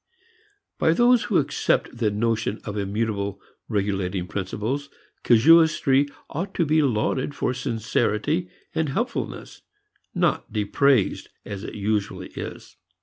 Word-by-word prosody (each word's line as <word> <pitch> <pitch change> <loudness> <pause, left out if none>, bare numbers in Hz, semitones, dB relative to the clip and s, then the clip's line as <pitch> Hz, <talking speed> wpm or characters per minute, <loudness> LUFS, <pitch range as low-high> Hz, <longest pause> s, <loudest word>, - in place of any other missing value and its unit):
By 160 - +4
those 240 +4 +4
who 205 - +2
accept 135 -3 0
the 115 -3 +1
notion 110 +1 -1
of 105 - -5
immutable 100 -1 -2 0.3
regulating 95 -3 -1
principles, 105 - -3 0.3
casuistry 145 +1 +5 0.2
ought 185 +6 -5
to 170 - +2
be 155 +1 +3
lauded 130 +2 0
for 125 - 0
sincerity 125 +6 -1 0.2
and 160 -2 0
helpfulness, 135 - -4 0.5
not - - 0
dispraised 105 +1 +2 0.2
as 100 -1 -6
it - - -7
usually 105 0 -2
is. - - -8
115 Hz, 115 wpm, -24 LUFS, 105-145 Hz, 0.5 s, casuistry